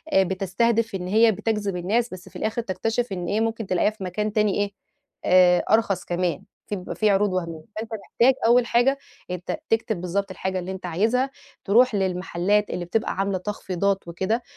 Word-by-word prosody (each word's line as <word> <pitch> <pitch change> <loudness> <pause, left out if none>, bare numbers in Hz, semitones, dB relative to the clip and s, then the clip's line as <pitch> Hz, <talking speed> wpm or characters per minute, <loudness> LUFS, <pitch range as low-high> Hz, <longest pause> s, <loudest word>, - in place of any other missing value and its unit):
بتستهدف 195 +4 +1
إن 180 -1 -4
هي 220 +4 +5
بتجذب 210 -1 -2
الناس 220 +6 0
بس 185 -1 -10
في - - -26
الآخر 220 +2 -1
تكتشف 225 +3 -2
إن 180 -2 -3
إيه 210 +4 0
ممكن 225 -2 -2
تلاقيها 185 +2 +2
في 215 -2 -10
مكان 210 +4 -2
تاني 210 -2 +2
إيه 205 0 -1 0.5
آآ، 180 -1 +5
أرخص 215 -3 +2
كمان 175 -1 -1 0.2
في 210 - -2
بيبقي 180 -2 -6
في 215 - +2
عروض 200 -1 +2
وهمية، 170 -3 -3
فأنت 220 +1 -5
محتاج 235 +4 +2
أول 240 +1 +5
حاجة 245 +4 +3 0.3
أنت 180 -1 -3
تكتب 220 -4 0
بالضبط 190 +2 -2
الحاجة 190 0 -3
اللي 180 +1 -5
أنت 190 -1 -7
عايزها 225 +10 +1 0.4
تروح 235 +3 +4
للمحلات 190 +1 0
اللي 175 - -3
بتبقى 210 +6 -1
عاملة 195 0 0
تخفيضات 195 0 -2
وكده 190 +8 -1
200 Hz, 175 wpm, -24 LUFS, 185-225 Hz, 0.5 s, هي